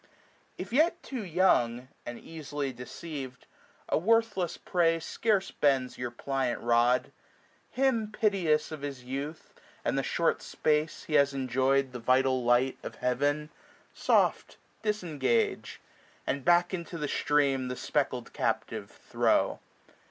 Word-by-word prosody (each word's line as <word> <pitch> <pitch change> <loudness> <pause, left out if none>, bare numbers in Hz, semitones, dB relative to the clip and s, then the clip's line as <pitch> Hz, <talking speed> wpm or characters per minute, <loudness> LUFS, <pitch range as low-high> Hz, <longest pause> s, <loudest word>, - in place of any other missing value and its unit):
If - - -7
yet 325 +5 +3
too 255 -5 -5
young, 130 -10 +2 0.2
and 120 - -5
easily 145 -4 -5
deceiv*d, 130 +1 -7 0.4
A - - +1
worthless 200 -3 +1
prey 165 -2 +1
scarce 200 +3 0
bends 135 -3 +1
your 125 -1 -2
pliant 130 0 -2
rod 120 +2 +3
j - - -21 0.6
415 270 - +2 0.2
Him - - -15
piteous 180 -10 +1
of 155 -2 -6
his 140 -3 -6
youth 140 +5 -6 0.3
and - - +1
the - - +2
short - - 0
space 155 +1 0
He 155 - -7
has 140 -1 +4
enjoy'd 130 +1 +1
the 125 - -6
vital 130 +1 +2
light 120 +2 +2
of - - -7
Heaven, 145 +5 0 0.4
Soft - - +1 0.2
disengage; 155 - 0 0.5
and 140 0 -2
back 175 +3 +4
into 170 -1 -4
the 150 -2 -2
stream 140 -3 +1
The 125 - -3
speckled 130 -3 -2
captive - - -2
throw. - - +1
145 Hz, 135 wpm, -29 LUFS, 130-170 Hz, 0.6 s, has